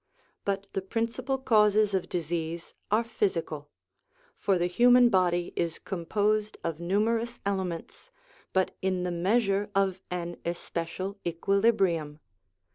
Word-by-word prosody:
But 200 0 -1
the 195 - -1
principal 230 +6 -2
causes 210 -4 +4
of 190 -2 -1
disease 165 0 -3 0.2
are 215 +3 +3
physical; 165 -9 -2 0.7
for 195 -2 +1
the 175 - +1
human 245 +6 +6
body 175 -4 +1
is 170 -1 -1
composed 210 +4 -1
of 165 -1 -3
numerous 225 +6 0
elements, 190 - -3 0.4
but 190 0 +1
in 185 -1 0
the 180 - -1
measure 195 +3 +1
of 195 -1 +1
an 175 -1 -4
especial 175 +3 -4
equilibrium. 175 -4 +1
190 Hz, 120 wpm, -28 LUFS, 170-215 Hz, 0.7 s, human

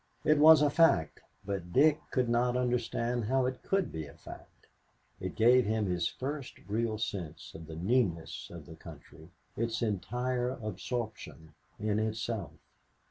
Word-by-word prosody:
It 155 -1 +4
was 155 0 +8
a 145 - +3
fact, 145 - +3 0.3
but 95 -3 -4
Dick 150 - +5
could 130 -2 +1
not 120 +1 +2
understand 120 -1 -1
how 130 +3 +2
it 130 0 -3
could 195 -3 0
be 80 -2 -5
a 70 - -14
fact. - - -13 0.5
It - - -5
gave 120 0 +5
him 110 0 +1
his 90 -2 0
first 140 0 -5
real 110 +1 -1
sense 95 -7 -5
of 80 -1 -10
the 80 - -8
newness 90 -2 -1
of 85 -4 -10
the 80 - -11
country, 80 0 -13 0.3
its 115 +1 -1
entire 125 +4 -1
absorption 110 -8 -5 0.3
in 105 0 0
itself. 110 -4 -3
115 Hz, 150 wpm, -31 LUFS, 90-125 Hz, 0.5 s, was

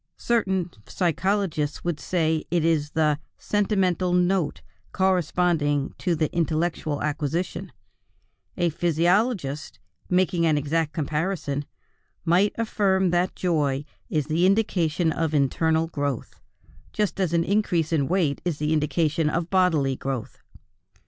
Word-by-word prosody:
Certain 190 -7 0 0.2
psychologists 180 -3 -1
would 170 -4 -2
say, 160 -1 0
it 170 -1 +1
is 150 -3 +1
the 150 -2 +2 0.2
"sentimental 190 -3 +1
note" 180 -3 +1 0.3
corresponding 175 -6 +1
to 175 -3 0
the 155 0 -1
intellectual 160 -2 -1
acquisition; 150 +3 -2 0.9
a 175 -1 +1
physiologist, 170 - 0 0.3
making 180 -1 +2
an 155 -2 +3
exact 155 +2 0
comparison, 150 -2 -2 0.6
might 180 +5 +3
affirm 195 -5 +1
that 175 +1 +1
joy 145 -6 0 0.2
is 150 -3 0
the 165 +4 +2
indication 175 -5 +1
of 160 -1 -1
internal 160 +3 +2
growth, 145 -6 -4 0.5
just 210 -2 -1
as 185 -4 +1
an 170 -1 +2
increase 175 -5 +1
in 140 -4 +2
weight 165 -6 0
is 175 -4 -1
the 150 +1 0
indication 155 0 +1
of 165 +2 -2
bodily 160 -8 +2
growth. 130 -3 -5
165 Hz, 120 wpm, -25 LUFS, 150-185 Hz, 0.9 s, an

